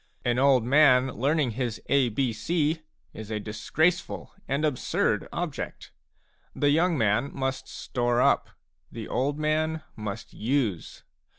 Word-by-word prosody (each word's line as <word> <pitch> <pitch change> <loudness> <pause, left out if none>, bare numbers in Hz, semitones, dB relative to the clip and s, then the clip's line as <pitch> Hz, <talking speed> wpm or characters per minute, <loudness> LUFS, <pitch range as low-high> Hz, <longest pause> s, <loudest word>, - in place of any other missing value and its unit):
An 120 0 +2
old 135 -3 +5
man 130 0 +5
learning 140 +2 +1
his 120 -1 -3
A 135 -3 +3
B 120 +1 0
C 160 +7 0 0.3
is 110 -1 -8
a 110 -1 -2
disgraceful 145 - -1 0.2
and 140 +3 0
absurd 145 -5 0
object; - - -5 0.6
the 145 0 +2
young 165 +2 +3
man 115 +3 +2
must 135 -1 -3
store 120 -1 -1
up, - - +3 0.4
the 115 -2 -7
old 140 +3 -1
man 155 +1 0
must 105 0 -6
use. 115 - -2
130 Hz, 130 wpm, -27 LUFS, 115-150 Hz, 0.6 s, old